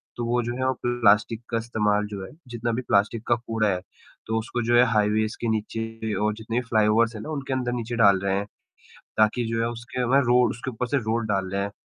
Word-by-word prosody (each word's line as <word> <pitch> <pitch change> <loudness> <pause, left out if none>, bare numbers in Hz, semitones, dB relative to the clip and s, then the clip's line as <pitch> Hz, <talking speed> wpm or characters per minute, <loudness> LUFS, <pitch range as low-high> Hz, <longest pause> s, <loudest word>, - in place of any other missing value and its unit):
तो 120 - -3
वो 120 +1 +1
जो 120 +1 -3
हैं, 130 0 0
प्लास्टिक 115 -1 +3
का 115 - 0
इस्तेमाल 105 -2 0
जो 100 -2 -6
है - - -12 0.2
जितना 120 -1 -3
भी 120 - -1
प्लास्टिक 110 0 +1
का 120 - +4
कूड़ा 115 -2 -1
है, 90 -2 -1 0.5
तो 110 - 0
उसको 120 +2 -3
जो 120 +1 +3
है 120 - +7
हाइवेज 105 +1 +1
के 120 - -1
नीचे 110 0 -3
और 105 0 0
जितने 110 +2 -4
भी - - -4
फ्लाईओवर्स 110 +1 +3
है 110 - -6
ना, - - -7
उनके 140 -3 -3
अंदर-नीचे 120 -2 -2
डाल 100 -4 +5
रहे 95 0 +1
हैं। 100 - -2 0.7
ताकि 110 +3 +3
जो 115 0 -1
है 115 - +1
उसके 120 +2 -5
ऊपर 135 +3 +3
रोड 125 +1 +4
उसके 115 +3 -5
ऊपर 125 +1 -3
से 140 - +1
रोड 115 +1 0
डाल 100 -2 0
रहे 100 0 -1
हैं, 100 +1 -3
115 Hz, 235 wpm, -25 LUFS, 105-120 Hz, 0.7 s, है